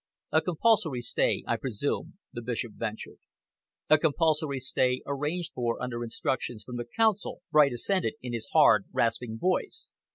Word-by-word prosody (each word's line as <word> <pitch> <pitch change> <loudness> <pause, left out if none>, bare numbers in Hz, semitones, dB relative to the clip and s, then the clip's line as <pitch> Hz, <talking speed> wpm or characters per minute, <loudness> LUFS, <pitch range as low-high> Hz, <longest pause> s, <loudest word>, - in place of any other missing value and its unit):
"A 160 - +4
compulsory 175 - +2
stay, - - +1
I - - 0
presume?" 140 - -3 0.2
the 120 - -5
Bishop 120 -1 -3
ventured. 110 +1 -6 0.7
"A 155 0 +6
compulsory 155 -2 +1
stay, 130 0 +1
arranged 150 +5 -2
for 120 -2 -1
under 120 -1 -3
instructions 120 -1 -3
from 125 +2 -7
the 120 0 -5
Council," 220 -3 +1
Bright 145 -3 +5
assented, 185 - 0
in 125 - -6
his 115 -1 -4
hard, - - +5
rasping 115 0 0
voice. 185 - -1
130 Hz, 150 wpm, -28 LUFS, 120-160 Hz, 0.7 s, A